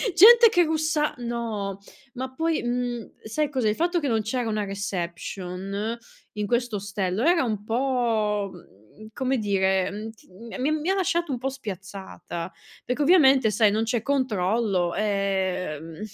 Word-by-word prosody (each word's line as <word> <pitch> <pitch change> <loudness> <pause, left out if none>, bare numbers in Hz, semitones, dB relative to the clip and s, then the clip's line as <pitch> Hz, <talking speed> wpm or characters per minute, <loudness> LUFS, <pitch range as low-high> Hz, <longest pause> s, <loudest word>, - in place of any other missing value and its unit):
gente 465 +5 +9
che 355 -4 +4
russa 315 -1 0
no, 225 -5 -3 0.3
ma 260 0 -5
poi, 325 +3 0
mhmm, 240 -1 -2
sai 290 +7 -1
cos'è, 255 -6 0
il 210 - 0
fatto 345 +4 +1
che 290 - -2
non 225 -3 +1
c'era 235 +2 -2
una 215 -1 -1
reception, 195 +2 -4 0.4
in 210 -1 -3
questo 240 -1 0
ostello 195 +1 -2
era 340 -2 +4
un 215 -4 -2
po', 225 -5 0
mhmm, 165 - -16
come 260 +1 0
dire, 190 -3 +1
mhmm, 215 +2 -6 0.5
mi 275 - +2
ha - - +1
mi 310 +4 -3
ha 390 - +1
lasciato 345 -4 0
un 250 - -2
po' 270 +2 -1
spiazzata, 190 -6 -7 0.3
perché 250 +4 -2
ovviamente 275 -7 +5
sai, 210 0 +4
non 220 +2 +1
c'è 225 0 0
controllo, 210 -8 0
ehm, 190 -6 -2
220 Hz, 150 wpm, -25 LUFS, 195-265 Hz, 0.5 s, gente